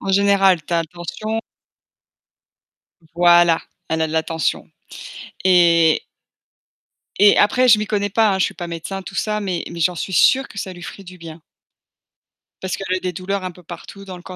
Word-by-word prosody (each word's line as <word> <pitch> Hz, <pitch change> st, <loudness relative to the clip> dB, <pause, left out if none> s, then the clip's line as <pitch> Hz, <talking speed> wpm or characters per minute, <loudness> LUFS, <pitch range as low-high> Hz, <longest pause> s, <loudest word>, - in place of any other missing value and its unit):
En 195 Hz, -, -3 dB
général, 195 Hz, -3 st, +3 dB
tu -, -, -7 dB
as 170 Hz, -, +2 dB
la 165 Hz, -, -1 dB
tension. 180 Hz, +6 st, -5 dB, 1.8 s
Voilà, 175 Hz, -1 st, +5 dB, 0.3 s
elle 160 Hz, 0 st, -1 dB
a 160 Hz, -, +1 dB
de -, -, -8 dB
la 160 Hz, 0 st, 0 dB
tension, 165 Hz, -2 st, -2 dB, 0.8 s
et 170 Hz, -3 st, +4 dB, 1.2 s
et 205 Hz, +1 st, +6 dB
après, 255 Hz, +5 st, +3 dB
je 215 Hz, -3 st, +6 dB
m'y 215 Hz, -, -3 dB
connais 205 Hz, -1 st, -1 dB
pas, 215 Hz, 0 st, +2 dB
hein. 190 Hz, -, -2 dB
Je -, -, +3 dB
suis -, -, -5 dB
pas 175 Hz, -, -7 dB
médecin 170 Hz, +3 st, -6 dB
tout 195 Hz, -, -10 dB
ça, 210 Hz, -1 st, -1 dB
mais 185 Hz, -4 st, -3 dB
mais 170 Hz, -, -8 dB
j'en 180 Hz, +2 st, +1 dB
suis 190 Hz, -, -5 dB
sûre 265 Hz, +9 st, +4 dB
que 210 Hz, -, -15 dB
ça 185 Hz, -, -6 dB
lui 175 Hz, -, -13 dB
ferait 195 Hz, -, -9 dB
du 180 Hz, 0 st, -13 dB
bien 165 Hz, -1 st, -11 dB, 1.2 s
parce 185 Hz, -, -3 dB
qu'elle 185 Hz, -1 st, -2 dB
a -, -, -6 dB
des 180 Hz, -1 st, -4 dB
douleurs 185 Hz, +3 st, -4 dB
un 185 Hz, -, -4 dB
peu 180 Hz, +1 st, -18 dB
partout 175 Hz, +4 st, -11 dB
dans 185 Hz, -2 st, -9 dB
le 175 Hz, -, -15 dB
tout 185 Hz, -, -10 dB
185 Hz, 200 wpm, -19 LUFS, 170-200 Hz, 1.8 s, et